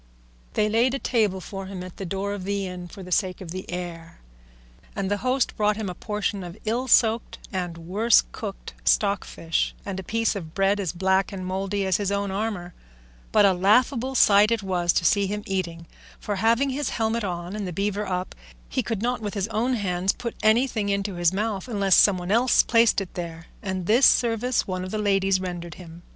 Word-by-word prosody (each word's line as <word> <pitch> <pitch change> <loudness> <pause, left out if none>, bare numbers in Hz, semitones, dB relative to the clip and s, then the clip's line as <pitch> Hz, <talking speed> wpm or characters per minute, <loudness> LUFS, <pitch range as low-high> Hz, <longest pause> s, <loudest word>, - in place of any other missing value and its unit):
They 210 - +2
laid 235 +5 +2
a - - 0
table 215 -8 +1
for 195 +1 -7
him 190 -2 -6
at 185 -1 -10
the 195 - -5
door 195 +3 -2
of 200 -2 -5
the 200 0 -2
inn 180 -1 -6
for 190 +3 -10
the 180 - -10
sake 185 0 0
of 180 -4 -8
the 185 +1 -7
air, 170 -2 -6 0.8
and 195 0 -2
the 205 - +2
host 255 +3 0
brought 210 -1 +1
him 210 -4 -3
a - - -6
portion 210 0 -3
of 175 +2 -8
ill 240 +4 -1
soaked 225 -2 +3 0.2
and 175 -3 -3
worse 200 +8 +3
cooked 200 -3 -7
stockfish, 200 -5 0
and 195 -2 -4
a - - -6
piece 225 +3 0
of 165 -5 -7
bread 195 +1 +2
as 190 -5 -1
black 190 +1 +1
and 190 -2 -6
mouldy 195 +2 -2
as 190 0 +2
his 200 -2 -1
own 200 -1 -1
armour; 195 -4 -3 0.6
but 210 -1 +5
a 195 - +5
laughable 240 +7 +2
sight 205 -3 +6
it 230 -3 0
was 175 -2 +1
to 170 - 0
see 200 +3 +3
him 210 +1 -4
eating, 170 -3 -3 0.3
for 205 -1 -3
having 230 +6 +2
his 285 +2 -2
helmet 225 0 -1
on 175 0 -4
and 205 -3 -3
the - - -4
beaver 205 +3 -2
up, 180 0 -3 0.4
he - - 0
could 220 -2 -3
not 245 -1 -1
with 210 0 -4
his 200 0 -1
own 230 +4 0
hands 190 -3 0
put 235 -1 -5
anything 220 -1 +2
into 200 0 -1
his 175 -1 +2
mouth 205 +1 -2
unless 200 -5 +3
some 205 -3 +6
one 180 +1 -4
else 240 +4 +4
placed 230 -3 +3
it 190 - -7
there, 165 -2 -6 0.2
and 190 -3 -3
this 235 +8 +6
service 240 +1 +2
one 185 -1 -3
of 185 - -5
the 215 - -3
ladies 195 -2 +2
rendered 175 -2 -5
him. 170 -2 -12
200 Hz, 210 wpm, -25 LUFS, 185-220 Hz, 0.8 s, sight